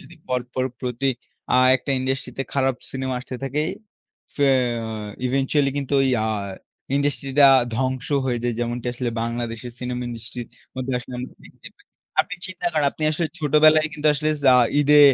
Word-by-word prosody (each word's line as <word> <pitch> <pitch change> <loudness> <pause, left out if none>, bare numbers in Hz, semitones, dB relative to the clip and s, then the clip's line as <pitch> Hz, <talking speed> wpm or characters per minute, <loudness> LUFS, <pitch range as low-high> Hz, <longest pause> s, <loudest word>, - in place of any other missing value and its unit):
যদি 175 - -14
পরপর 125 0 -1 0.2
প্রতি 125 +1 -2 0.5
আ - - +4 0.2
একটা 135 - -6
ইন্ডাস্ট্রি 130 0 -2
তে - - +1
খারাপ 135 -2 +2 0.2
সিনেমা 130 -1 -2
আসতে 130 - -8
থাকে। 135 +2 -1 0.7
ফে 145 -1 +2 0.8
eventually 135 +2 +1
কিন্তু 140 -1 -3
ওই 135 - +2 0.2
আ - - 0 0.7
ইন্ডাস্ট্রিটা 140 0 +3 0.3
ধ্বংস 130 +2 -1 0.2
হয়ে 125 -2 0
যায়। 120 0 0
যেমনটি 120 0 -2
আসলে 125 0 -3
বাংলাদেশের 115 0 -4
সিনেমা 125 0 -3
ইন্ডাস্ট্রির 120 0 -7 0.3
মধ্যে 130 0 -3
আসলে 125 +1 -10
আমরা 125 - -6
দেখতে - - -13
পাই। - - -26 0.4
আপনি 180 - -4
চিন্তা 185 -2 -5
করেন, 150 -2 +2
আপনি - - -8
আসলে 165 +2 0
ছোটবেলায় 155 +1 +5
কিন্তু 155 -1 -3
আসলে 150 +2 0
যা 130 - +7 0.3
ঈদে 150 +1 +6
130 Hz, 160 wpm, -23 LUFS, 125-145 Hz, 0.8 s, যা